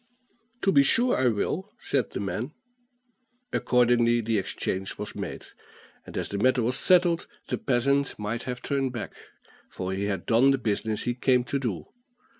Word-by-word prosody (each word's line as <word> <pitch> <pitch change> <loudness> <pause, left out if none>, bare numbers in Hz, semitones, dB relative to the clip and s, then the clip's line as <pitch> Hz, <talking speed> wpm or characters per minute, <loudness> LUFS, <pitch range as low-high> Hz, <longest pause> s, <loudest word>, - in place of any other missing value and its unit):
"To 195 - +4
be 140 - +6
sure 240 - +3
I 130 - +2
will," 150 - -1
said - - -1
the - - -5
man. 110 +8 -3 1.0
Accordingly 120 -1 +3
the 110 -1 0
exchange 95 0 -3
was - - -5
made; - - -6 0.6
and - - -7
as - - -2
the 100 - -3
matter 130 +1 +3
was 125 +3 0
settled, 175 +1 +3 0.2
the - - -1
peasant 140 +2 +1
might 105 +3 -3
have 125 -1 -5
turned 135 -2 -1
back; 115 - -5 0.6
for 95 0 -4
he 100 +1 -2
had 100 -1 -2
done 120 +4 +5
the 135 - +4
business 110 -2 -1
he 120 - 0
came 125 0 +2
to 140 +3 -2
do. 115 -10 -3
125 Hz, 170 wpm, -27 LUFS, 110-135 Hz, 1.0 s, be